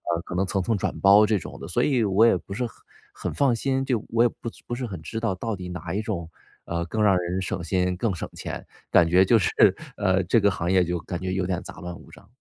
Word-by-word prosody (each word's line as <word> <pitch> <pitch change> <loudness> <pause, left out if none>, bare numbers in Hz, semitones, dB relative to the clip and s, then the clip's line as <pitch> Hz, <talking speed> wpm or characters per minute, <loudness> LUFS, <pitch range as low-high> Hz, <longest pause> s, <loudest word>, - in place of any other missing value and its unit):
呃， 85 - -3
可 90 - -7
能 95 +2 +1
层 95 +1 -1
层 110 +4 0
转 - - -2
包 100 +2 +7
这 105 0 +2
种 - - -9
的， - - -7
所 - - 0
以 130 -5 +2
我 105 +2 +4
也 115 - +5
不 100 - -9
是 125 +5 -2
很 115 - -8 0.4
很 - - -5
放 135 -4 +2
心。 135 +3 0
就 125 -5 0
我 115 +1 +3
也 120 - +4
不 115 - -7 0.2
不 - - -5
是 125 +1 -4
很 95 -8 -7
知 110 +8 -5
道 115 -3 0
到 110 +3 -3
底 90 -1 -7
哪 90 -1 -5
一 105 - 0
种， 95 -7 -4 0.4
呃， 85 0 -2
更 110 +6 -2
让 100 -2 +5
人 90 +1 -2
省 90 -1 -3
心、 90 +1 0
更 100 +2 -1
省 85 - -5
钱， - - -6 0.3
感 85 - +6
觉 90 +3 +5
就 115 - +5
是， 95 - +1 0.5
呃， 95 -1 +1
这 90 +6 +3
个 100 - +4
行 85 -2 -2
业 95 -1 +4
就 90 0 -2
感 85 +2 -5
觉 95 0 -2
有 95 -1 0
点 90 -1 -2
杂 - - -10
乱 90 0 -6
无 - - -16
章。 100 - -16
95 Hz, 295 characters per minute, -25 LUFS, 90-110 Hz, 0.5 s, 包